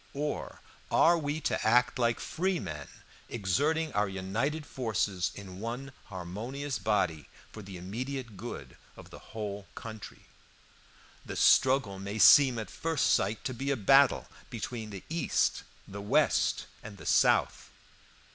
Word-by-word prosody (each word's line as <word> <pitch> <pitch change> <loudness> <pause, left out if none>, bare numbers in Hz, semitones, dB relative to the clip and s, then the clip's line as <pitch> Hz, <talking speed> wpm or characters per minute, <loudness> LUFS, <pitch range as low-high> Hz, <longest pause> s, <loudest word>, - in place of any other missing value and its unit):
or 145 +1 -4 0.3
are 170 - +5
we 150 -1 -2
to - - -1
act 125 +4 +3
like 115 -1 +1
free 185 +1 -1
men, 75 - -6 0.4
exerting 145 - 0
our 105 -1 +1
united 115 +12 -2
forces 105 -8 -1
in 95 -2 -9
one 120 +5 -5
harmonious 115 +10 -5
body 90 -9 0 0.2
for 110 - -9
the 95 -2 -9
immediate 120 +5 -5
good 90 - -8 0.2
of - - -13
the - - -10 0.2
whole 100 -2 -5
country? 110 -2 -9 1.0
The - - -7
struggle 130 -7 +4
may 100 +2 -5
seem 130 +2 +7
at 110 - -5
first 160 -3 +1
sight 100 +3 0
to 130 - -3
be 135 +3 -4
a 140 - +1
battle 135 +6 +4 0.2
between 115 -2 -5
the 100 -3 -8
East, 165 +1 0 0.3
the 100 +1 -7
West, 100 - +2 0.2
and 105 -1 -10
the - - -12
South. - - +2
110 Hz, 140 wpm, -30 LUFS, 100-135 Hz, 1.0 s, seem